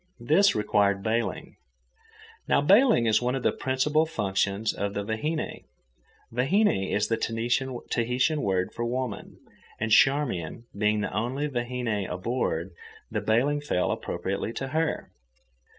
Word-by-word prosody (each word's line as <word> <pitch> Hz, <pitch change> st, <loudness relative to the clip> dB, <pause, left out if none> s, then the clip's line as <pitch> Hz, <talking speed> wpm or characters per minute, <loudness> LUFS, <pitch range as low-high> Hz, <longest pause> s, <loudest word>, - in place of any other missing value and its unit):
This 190 Hz, +9 st, +4 dB
required 100 Hz, -2 st, +2 dB
bailing. 110 Hz, -1 st, -2 dB, 0.9 s
Now -, -, +4 dB
bailing 200 Hz, -, +5 dB
is 110 Hz, 0 st, +3 dB
one 125 Hz, +1 st, 0 dB
of 130 Hz, -, -3 dB
the -, -, +3 dB
principal 150 Hz, +4 st, +1 dB
functions 100 Hz, -4 st, -1 dB
of 100 Hz, 0 st, -3 dB
the 100 Hz, -, -1 dB
vahine. 150 Hz, +10 st, -3 dB, 0.7 s
Vahine 130 Hz, -, +2 dB
is 105 Hz, -, +1 dB
the 115 Hz, -, 0 dB
Tahitian 120 Hz, -, 0 dB
for 120 Hz, -, -4 dB
woman, 120 Hz, -3 st, -4 dB, 0.4 s
and 110 Hz, +1 st, -2 dB
Charmian 120 Hz, -, +2 dB
being 105 Hz, +1 st, +1 dB
the 105 Hz, -, -3 dB
only 125 Hz, +8 st, -1 dB
vahine 120 Hz, -5 st, -2 dB
aboard, 90 Hz, -3 st, -2 dB, 0.4 s
the -, -, -1 dB
bailing 135 Hz, +7 st, +1 dB
fell 90 Hz, -11 st, 0 dB
appropriately 95 Hz, +5 st, -3 dB
to 135 Hz, +2 st, -4 dB
her. 160 Hz, +2 st, -1 dB
120 Hz, 125 wpm, -27 LUFS, 105-135 Hz, 0.9 s, bailing